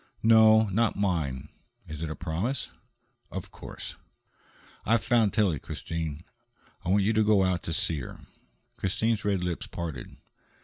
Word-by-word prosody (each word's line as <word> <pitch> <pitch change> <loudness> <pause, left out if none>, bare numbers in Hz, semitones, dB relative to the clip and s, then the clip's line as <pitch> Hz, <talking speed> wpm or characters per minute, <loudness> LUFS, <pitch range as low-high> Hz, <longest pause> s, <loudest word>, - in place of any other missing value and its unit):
"No, 110 -1 +7
not 110 +4 +2
mine. 75 -9 -1 0.4
Is 80 0 -7
it 80 - -2
a 80 - -4
promise?" 90 +10 -2 0.6
"Of - - -6
course." - - -9 0.9
"I've 115 -3 +2
found 115 -1 +3
Tillie, 95 - +2
Christine. 80 +1 -5 0.6
I - - -3
want 100 +1 +4
you 110 +3 +2
to 110 0 +3
go 105 -2 +4
out 90 -1 +1
to - - -5
see 80 -1 -1
her." 65 - -8 0.6
Christine's 110 +3 0
red 100 -3 0
lips 90 -2 -3
parted. 80 -8 -6
95 Hz, 145 wpm, -28 LUFS, 80-110 Hz, 0.9 s, No